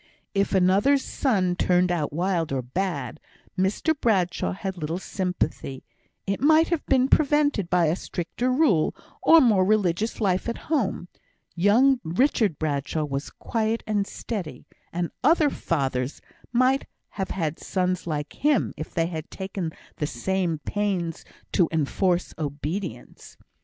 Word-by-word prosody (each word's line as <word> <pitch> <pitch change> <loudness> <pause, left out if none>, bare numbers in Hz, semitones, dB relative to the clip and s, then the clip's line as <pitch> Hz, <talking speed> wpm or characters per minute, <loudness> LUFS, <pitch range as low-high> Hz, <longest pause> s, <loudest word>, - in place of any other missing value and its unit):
If 200 0 +1
another's 200 +10 +4
son 190 -9 +1
turned 180 0 +2
out 160 -4 -1
wild 170 0 0
or 130 -2 -1
bad, 145 -1 -3 0.4
Mr 195 - +1
Bradshaw 195 - 0
had 190 0 -4
little 160 +2 -2
sympathy; 180 -8 -3 0.4
it 195 0 -2
might 315 +3 +5
have 340 -3 0
been 260 0 +4
prevented 290 - +2
by 180 -2 +3
a 155 +2 +2
stricter 195 +8 -3
rule, 255 - +3 0.3
or 330 - +7
more 220 -9 +4
religious 205 +1 +1
life 190 0 +1
at 235 - -3
home; 250 - -1 0.5
young 235 +9 +4
Richard 200 - +1
Bradshaw 150 0 -1
was 140 -1 -3
quiet 225 0 -2
and 205 -2 0
steady, 195 -10 -6 0.3
and 175 0 -2
other 305 0 +4
fathers 135 -4 -2 0.3
might 255 +3 +2 0.2
have 190 -2 -4
had 160 -4 -2
sons 185 -1 -1
like 150 -2 -3
him 295 -4 +1
if 155 - -7
they 165 - +2
had 160 -2 -5
taken 190 -3 -4 0.3
the 150 - -1
same 175 +5 -1
pains 190 -6 -2 0.3
to 175 -4 +3
enforce 175 +4 0
obedience. 145 - -5
185 Hz, 135 wpm, -25 LUFS, 165-225 Hz, 0.5 s, or